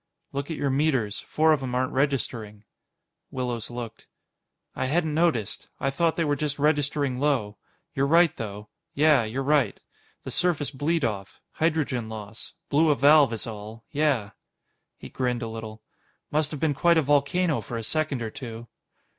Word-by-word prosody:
"Look 140 +2 -3
at 160 - -3
your 140 - 0
meters. 135 -7 +1
Four 155 0 +4
of 150 - 0
'em 125 -2 -3
aren't 130 +2 0
registering." 120 -6 -1 0.7
Willows 125 -3 -3
looked. 120 -2 -7 0.7
"I - - -1
hadn't 160 +2 +1
noticed. 155 - 0
I 135 - 0
thought 165 +4 +1
they 165 - +1
were 145 -1 +1
just 145 0 -2
registering 145 -3 +1
low. 125 -8 0 0.3
You're 135 +1 +1
right, 170 +2 +5
though. 105 -1 -6 0.3
Yeah. 145 -4 +5
You're 125 +5 -3
right. 140 -6 +2 0.4
The - - -5
surface 160 -6 +1
bleed 150 +2 0
off. 100 -4 -4
Hydrogen 150 -8 0
loss. 110 0 -8 0.2
Blew 155 +2 +4
a 150 - +4
valve, 145 -2 +6
is 115 - -4
all. 110 0 -8
Yeah." 140 -9 +1 0.7
He - - -9
grinned 125 -2 -2
a - - -3
little. 110 -1 -8 0.5
"Must've 150 -1 0
been 155 -1 +1
quite 170 +4 +3
a 160 - +4
volcano 145 +4 +2
for 120 - -5
a 115 - -4
second 150 -1 -1
or 110 - -4
two." 115 -2 -8
135 Hz, 165 wpm, -26 LUFS, 115-150 Hz, 0.7 s, valve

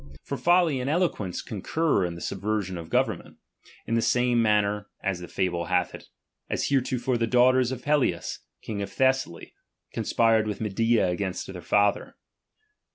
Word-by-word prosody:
Yov 140 - -2
folly 175 -5 +3
and 125 +2 -2
eloquence 150 - -1
concur 120 - 0
in 85 -1 -4
the 85 - -9
subversion 100 -1 -2
of 85 -2 -7
government, - - -1 0.5
in - - -3
the 115 - +2
same 125 +1 +2
manner 105 -1 +1 0.2
(as 95 -2 -1
the 90 - -8
fable 90 -2 -1
hath 90 0 0
it) - - -10 0.4
as - - -1
heretofore 130 -2 0
the 115 - +1
daughters 125 +1 +4
of 125 -1 -6
Pelias, 140 - 0 0.2
king 105 -2 -4
of 100 - -5
Thessaly, 130 -10 0 0.4
con - - -2
spired 115 -2 +2
with 105 - -4
Medea 110 0 +1
against 90 +1 -3
their 90 - -8
father. 105 +2 +1
110 Hz, 160 wpm, -26 LUFS, 95-130 Hz, 0.5 s, daughters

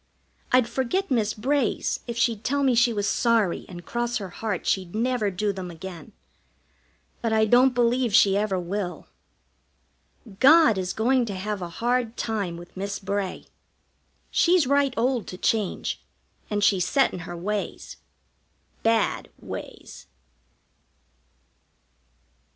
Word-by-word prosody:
I'd 250 -2 +4
forget 265 +10 -1
Miss 220 -4 +1
Bray's 265 +2 0
if 235 -1 -4
she'd 230 -2 +1
tell 280 +1 0
me 265 -2 +3
she 240 0 +4
was 205 -3 -1
sorry 225 -4 +1
and 175 -2 -10
cross 240 +2 -2
her 195 -3 -6
heart 205 0 -4
she'd 185 -1 -1
never 235 -2 0
do 200 +2 -1
them 185 -2 -6
again. 175 +4 -9 1.1
But 230 -1 0
I 220 0 +4
don't 250 +3 +4
believe 245 0 +2
she 195 -1 +5
ever 200 -2 0
will. 180 +1 -4 1.3
God 300 -6 +6
is 180 -1 -2
going 250 +2 +2
to 200 - -4
have 200 +1 -4
a 175 - -4
hard 240 +4 -1
time 200 -7 -2
with 175 +1 -13
Miss 200 +1 -3
Bray. 200 -1 -3 0.9
She's 350 -3 +4
right 280 0 +2
old 245 -1 0
to 180 - -7
change, 210 0 -1 0.5
and 205 -1 -1
she's 185 -3 +3
set 270 +7 +3
in - - -5
her 175 0 -7
ways 205 +3 -4 0.8
bad 225 -1 +1
ways. - - -9
220 Hz, 135 wpm, -25 LUFS, 190-245 Hz, 1.3 s, God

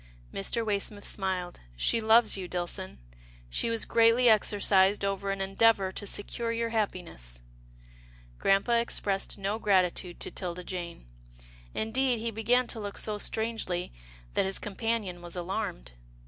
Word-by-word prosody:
Mr. 225 - -1
Waysmith 205 0 -2
smiled. 185 -3 -2
" - - -25
She 230 - +3
loves 225 +1 +5
you, 185 -2 -5
Dillson. 180 +2 -3 0.5
She 230 - 0
was 230 -1 0
greatly 230 +2 +5
exercised 200 -2 +4
over 195 0 -1
an 195 0 -1
endeavour 195 0 +3
to 205 +2 -6
secure 230 +4 -2
your 230 0 -1
happiness." 175 - -3 1.0
Grampa 200 +5 +3
expressed 200 -4 -1
no 200 +2 -2
gratitude 185 -4 +1
to - - -2
'Tilda 180 -1 -4
Jane. 175 - -6 0.7
Indeed, 245 +3 +1
he 230 +1 -2
began 235 +4 +2
to 235 - -3
look 205 -1 -5
so 210 -1 -2
strangely 220 - -2 0.4
that - - +2
his 195 0 -1
com 210 - -6
panion 220 -6 -2
was 175 0 -6
alarmed. 175 - -4
200 Hz, 145 wpm, -29 LUFS, 185-225 Hz, 1.0 s, loves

